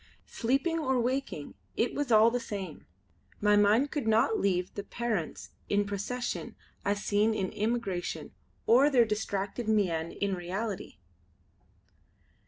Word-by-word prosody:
Sleeping 275 +8 0
or 265 -5 +1
waking 250 - -2 0.2
it 235 - +1
was 290 -4 -2
all 220 +1 +7
the 245 - 0
same; 195 -8 -6 0.5
my 210 0 +4
mind 210 +7 +4
could 285 -7 -2
not 225 +2 +3
leave 180 -2 0
the 200 - -4
parents 220 -6 -3 0.2
in 205 0 +2
procession 205 +5 -3 0.3
as 205 +1 -1
seen 215 +2 +2
in 190 -3 -1
imagination, 205 -5 -2 0.3
or 265 +5 +6
their 250 -5 +5
distracted 210 +1 -2
mien 175 -7 +1
in 200 -1 -1
reality. 190 +4 -4
215 Hz, 130 wpm, -30 LUFS, 200-240 Hz, 0.5 s, all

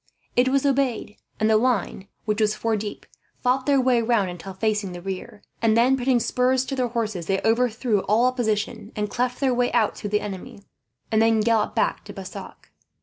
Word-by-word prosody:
It 245 +1 +4
was 275 +1 +2
obeyed, 265 -6 0 0.2
and 215 - +2
the 220 0 +5
line, 220 -4 0 0.2
which 215 0 0
was 215 0 +2
four 225 0 0
deep, 210 0 -5 0.4
fought 255 +2 +1
their 280 -1 +4
way 250 -2 +3
round 225 -5 +1
until 180 +2 -9
facing 210 -2 -1
the 175 - -8
rear; 195 +2 -7 0.2
and 225 -1 +3
then, 250 +3 +4
putting 255 -1 +2
spurs 255 +2 +1
to 270 - -3
their 255 -2 0
horses, 215 -8 -3
they 195 0 +1
overthrew 230 -1 +2
all 220 +4 +3
opposition 220 -3 -1
and 210 -1 -2
cleft 250 0 -1
their 265 -2 +2
way 245 0 +1
out 230 -3 +2
through 205 - -5
the 210 +1 +1
enemy, 200 0 -7 0.5
and 220 0 +3
then 225 0 +4
galloped 220 -1 +1
back - - 0
to - - -9
Bassac. - - -10
225 Hz, 200 wpm, -24 LUFS, 210-250 Hz, 0.5 s, the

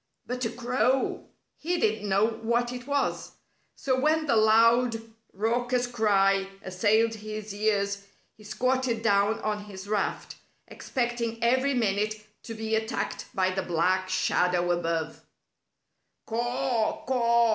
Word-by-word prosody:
But 250 +1 -4
a - - 0
crow! 250 +2 0 0.3
He 350 +3 -1
didn't 215 -7 0
know 195 +2 +4
what 235 +2 -1
it 250 +1 -8
was. 285 -1 -1 0.4
So 260 -1 0
when 310 +3 +2
the 275 - +2
loud, 230 +2 +4 0.3
raucous 245 +4 0
cry 195 -5 +2 0.2
assailed 220 +4 +2
his 215 -1 -7
ears, 200 -1 -1 0.3
he 215 - -17
squatted 255 +1 -1
down 205 0 +2
on 210 -1 -2
his 195 -1 -9
raft, 210 -1 -2 0.3
expecting 240 -3 -3
every 260 +3 +2
minute 215 -2 0 0.3
to 225 - -6
be 220 0 -4
attacked 220 0 -2
by 185 -1 +2
the 190 +1 -2
black 185 +2 0
shadow 180 -1 +1
above. 165 -2 -2 1.0
"Caw! 240 0 -1
Caw!" 235 -2 +3
220 Hz, 125 wpm, -27 LUFS, 200-245 Hz, 1.0 s, know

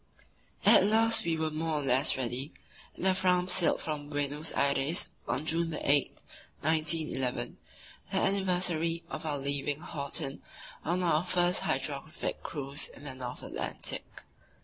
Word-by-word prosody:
At - - +8
last 225 +1 +4
we 165 -1 +1
were 160 0 -1
more 160 +1 -1
or 145 - -1
less 135 +2 +3
ready, 130 +3 -2 0.4
and - - -5
the 190 - +5
Fram 180 -1 +2
sailed 180 -2 +3
from 150 -2 -4
Buenos 145 +1 -1
Aires 140 +3 +1 0.2
on 140 +5 -1
June 165 0 0
8, 140 -1 +2 0.4
1911, 155 -4 0 0.5
the 195 - 0
anniversary 180 -4 +1
of 160 - -4
our 145 -2 0
leaving 140 +1 -1
Horten 140 -4 -4 0.4
on 180 +3 0
our 165 -2 +3
first 180 0 +2
hydrographic 155 -4 -3
cruise 145 -4 -3
in - - -14
the 140 -2 -6
North 125 -1 -7
Atlantic. - - -5
155 Hz, 140 wpm, -30 LUFS, 140-175 Hz, 0.5 s, At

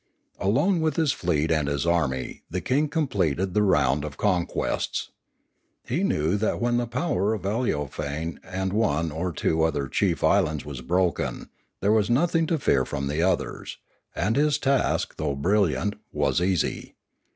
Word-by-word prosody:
Alone 150 - +2
with 155 -3 +1
his 160 -4 +2
fleet 80 - 0
and 75 -3 +1
his 70 +1 -1
army 80 -7 0
the 90 - -2
king 140 +9 +1
completed 95 - 0
the 105 - +3
round 75 -7 +2
of 75 -2 -6
conquests. 90 -5 -1 0.7
He 155 +11 -1
knew 80 - +1
that 110 +1 0
when 120 0 +1
the 120 0 -1
power 120 - 0
of 105 - -8
Aleofane 80 - -2
and 95 +1 -3
one 85 -7 +1
or 85 +4 -2
two 80 +1 0
other 75 -4 +1
chief 90 +4 0
islands 80 -4 +2
was 70 -4 -6
broken, 90 +5 -1 0.3
there 100 - +3
Was 110 -1 +3
nothing 165 +6 +2
to 165 - +1
fear 70 - +2
from 70 +2 -4
the 75 +3 0
others, 90 0 -1 0.4
and 110 +3 0
his 150 0 +3
task, 140 -3 0
though 70 - -1
brilliant, 100 +5 +1 0.2
was - - +1
easy. 90 -1 -1
95 Hz, 160 wpm, -25 LUFS, 80-120 Hz, 0.7 s, the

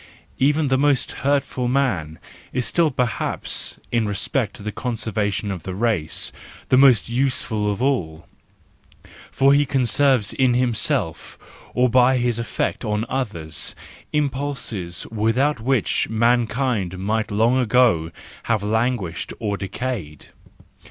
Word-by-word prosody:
Even 145 +2 +2
the 130 0 +2
most 145 -2 +2
hurtful 135 -2 0
man 105 - 0 0.3
is 125 -1 -1
still 170 -2 +2
perhaps, 125 -5 -2
in 115 -2 +1
respect 105 +2 -1
to 105 - -11
the 105 - -3
conservation 105 -3 -2
of 95 -3 -5
the 90 +3 -6
race, 100 -7 0 0.4
the - - +5
most 130 -3 +5
useful 120 -4 0
of 105 +5 -3
all; 85 - -1 1.0
for 135 +1 +4
he 145 +1 +4
conserves 130 -3 +2
in 130 -2 +2
himself, 120 -3 -1 0.4
or 125 +1 +4
by 125 +1 +4
his 120 -2 0
effect 115 - -2
on 105 0 -1
others, 80 - -3 0.4
impulses 135 - -2
without 115 +6 +1
which 125 0 0
mankind 115 -3 +1
might 110 +4 -1
long 115 +5 +2
ago 120 -9 +3 0.4
have 115 -3 +1
lan¬ 110 +4 +1
guished 90 -6 -6
or 105 -2 -2
decayed. 100 - -5
120 Hz, 125 wpm, -22 LUFS, 105-130 Hz, 1.0 s, the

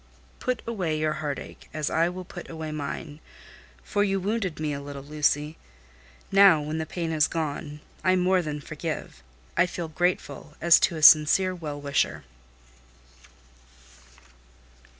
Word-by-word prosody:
"Put 255 -2 -2
away 185 -9 -2
your 155 0 0
heart 145 -2 -2
ache, - - -11
as 155 -1 -2
I 165 +2 +2
will 180 +1 -7
put 175 0 -10
away 160 -1 -6
mine; 150 0 -5 0.6
for 205 - 0
you 195 -1 0
wounded 195 -3 -2
me 155 -1 -1
a 140 - -5
little, 140 -1 -8
Lucy. 150 +1 0 0.7
Now, 195 -4 +7
when 155 +2 -3
the 160 - -3
pain 170 -1 -3
is 155 -1 +3
gone, 150 -1 -4 0.2
I 185 0 +4
more 185 0 +3
than 150 -3 -5
forgive: 155 - -6 0.3
I 175 - +4
feel 170 -2 -5
grateful, 155 -3 -2
as 170 0 +6
to 170 - +1
a 155 - -5
sincere 160 +5 +7
well 150 -5 -6
wisher." 140 -1 -1
160 Hz, 150 wpm, -26 LUFS, 150-180 Hz, 0.7 s, Now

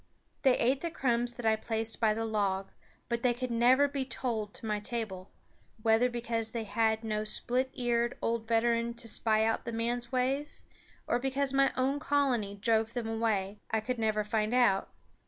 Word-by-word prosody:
They 260 -3 +4
ate 260 +3 +2
the 340 - -2
crumbs 240 -6 0
that 245 - -7
I 220 0 +4
placed 225 0 -3
by 215 -2 +3
the 225 +1 -2
log; 200 -3 -1 0.4
but 235 -1 -1
they 245 -1 +2
could 250 0 -4
never 250 +4 +5
be 275 -1 -2
tolled 230 -4 -3
to - - -9
my 210 -1 -1
table, 210 -4 -4 0.5
whether 225 +2 +4
because 230 -2 -2
they 230 -2 -2
had 220 +1 +1
no 215 -1 -1
split 250 +4 -1
eared 240 -2 0
old 230 -1 -1
veteran 235 +1 +1
to 235 0 -5
spy 220 0 +2
out 225 - 0
the 235 - -4
man's 235 +1 -2
ways, 270 +3 -1 0.4
or 240 - +1
because 270 +1 0
my 275 0 +4
own 270 +3 +1
colony 265 -9 +1
drove 225 +2 +1
them 240 -3 -3
away, 215 -3 -1
I 220 - +1
could 240 +3 -3
never 215 -1 +1
find 215 +2 0
out. 215 -6 +3
230 Hz, 185 wpm, -31 LUFS, 220-250 Hz, 0.5 s, never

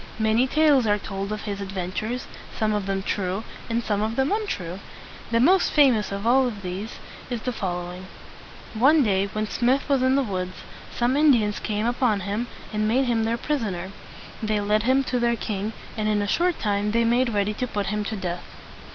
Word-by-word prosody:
Many 220 +3 +2
tales 290 -4 +4
are 205 0 +3
told 195 0 -5
of 215 -1 -4
his 200 -2 -4
ad 195 -1 -5
ven 180 -2 -3
tures, 230 +6 -3 0.3
some 215 -1 +1
of 205 -2 -2
them 195 0 -1
true 195 +1 -2 0.3
and 230 +1 0
some 205 -2 0
of 220 +1 -1
them 265 +2 +1
untrue. 195 - -2 0.5
The 230 0 +2
most 365 +9 +4
famous 255 -9 +4
of 200 +2 -4
all 255 +2 +4
these 200 0 -6 0.3
is 240 -3 -3
the 250 - -1
fol 180 -6 -3
low 175 0 -7
ing: 185 +1 -9 0.7
One 275 +7 +5
day 200 -3 +2
when 215 +1 -1
Smith 250 +5 +1
was 275 -3 +2
in 260 +1 +3
the 275 - +3
woods, 185 -4 -4 0.3
some 245 +2 +1
Indians 245 -9 +3
came 210 0 -2
upon 240 -4 +1
him, 205 +5 -2 0.3
and 215 0 +1
made 255 +5 +2
him 230 -2 +1
their 230 +1 0
pris 295 +2 -1
on 205 -5 -2
er. 180 +2 -6 0.5
They 215 -1 0
led 210 +1 +2
him 260 +4 +3
to 250 -1 -1
their 235 0 +2
king, 210 -1 -3 0.2
and 215 -1 -1
in 210 -1 +1
a - - -2
short 350 - +1
time 205 0 0
they 235 0 +3
made 240 +2 +3
ready 205 -1 0
to 250 +4 -3
put 205 -3 -2
him 210 0 -1
to 220 - -3
death. 180 -3 -4
215 Hz, 215 wpm, -24 LUFS, 200-250 Hz, 0.7 s, One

